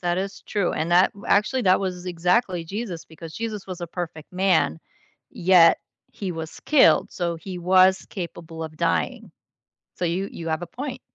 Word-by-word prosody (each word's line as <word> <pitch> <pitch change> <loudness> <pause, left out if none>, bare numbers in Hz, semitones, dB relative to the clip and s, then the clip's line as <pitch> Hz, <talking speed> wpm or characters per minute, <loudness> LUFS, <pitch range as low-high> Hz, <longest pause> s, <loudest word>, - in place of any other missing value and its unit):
that 175 0 0
is 195 +1 -5
true, 200 -4 -1
and 160 +2 -2
that 180 +2 +5
w 200 - -12
actually 230 +6 +2
that 185 -3 +4
was 185 -2 -4
exactly 180 +1 +1
Jesus 190 -3 -5
because 160 0 -11
Jesus 215 -3 -5
was 185 -1 -7
a 175 - -4
perfect 165 -2 -7
man, 180 - +2 0.5
yet 175 -2 +5 0.3
he 190 -3 -4
was 160 -1 -7
killed, 300 -3 +4
so 170 -2 -2
he 180 +2 -7
was 185 +1 +4
capable 170 -3 -7
of 155 -1 -7
dying. - - -1 0.7
So, 180 - -2
you 180 +4 -1
you 165 -1 -6
have 160 +1 -1
a 175 - -5
point. 255 +4 -6
180 Hz, 180 wpm, -24 LUFS, 165-195 Hz, 0.7 s, that